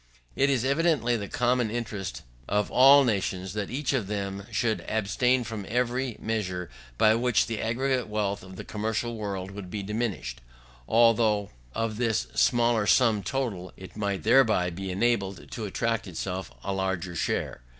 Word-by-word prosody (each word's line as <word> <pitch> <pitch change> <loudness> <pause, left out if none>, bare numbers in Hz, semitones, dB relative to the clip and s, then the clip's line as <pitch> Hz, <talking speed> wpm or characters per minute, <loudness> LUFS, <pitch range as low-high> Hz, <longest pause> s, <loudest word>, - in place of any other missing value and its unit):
It 135 +1 +3
is 130 -3 +1
evidently 140 -4 +2
the 100 -3 -3
common 125 0 +1
interest 105 -5 -4 0.3
of 105 0 0
all 140 +2 +8
nations 95 -5 -1
that 105 -2 -3
each 140 +2 -1
of 120 -8 0
them 100 -1 -4
should 110 -2 0
abstain 125 +4 +1
from 110 -3 -5
every 125 +1 -1
measure 95 - -3 0.3
by 110 - +5
which 120 0 +2
the 115 -1 -3
aggregate 125 +2 0
wealth 105 -2 -1
of 95 0 -11
the - - -7
commercial 110 +2 -2
world 100 -3 -4
would 100 -2 -8
be 105 +1 -4
diminished, 100 - -3 0.5
although 110 -3 +3 0.2
of 115 -1 -1
this 110 - +1
smaller 120 -3 +3
sum 115 -5 +4
total 100 -4 -3
it 95 -2 -11
might 100 -2 -2
thereby 110 -7 +4
be 95 +3 -5
enabled 100 -1 -1
to 110 - -4
attract 115 +3 -1
to - - -8
itself 95 +2 -4
a 100 - -2
larger 95 -2 -2
share. - - -2
110 Hz, 160 wpm, -27 LUFS, 95-120 Hz, 0.5 s, all